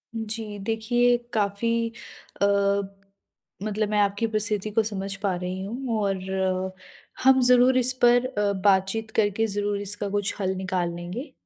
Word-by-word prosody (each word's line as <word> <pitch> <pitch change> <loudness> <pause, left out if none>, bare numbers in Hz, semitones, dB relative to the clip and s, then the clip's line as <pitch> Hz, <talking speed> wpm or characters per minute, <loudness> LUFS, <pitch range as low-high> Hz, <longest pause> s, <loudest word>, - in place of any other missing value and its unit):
जी, 220 -1 -5
देखिए 240 +3 +1 0.2
काफ़ी 230 +3 0 0.5
अ, - - +5 1.2
मतलब 215 0 -1
मैं 210 -1 +1
आपकी 205 +3 +1
परिस्थिति 215 -1 -1
को 225 +1 +2
समझ 195 -2 -4
पा 190 -3 +1
रही 180 +1 -4
हूँ 230 +1 -3
और 195 -1 0 1.1
हम 265 0 +6
ज़रूर 250 +1 +5
इस 255 +1 +4
पर 245 +1 +5
अ, 210 -5 0
बातचीत 195 +3 +1
करके 215 +1 +1
ज़रूर 205 0 -1
इसका 205 0 -1
कुछ 205 0 -1
हल 190 -1 -1
निकाल 185 -2 -2
लेंगे। 200 - -6
210 Hz, 140 wpm, -25 LUFS, 200-230 Hz, 1.2 s, हम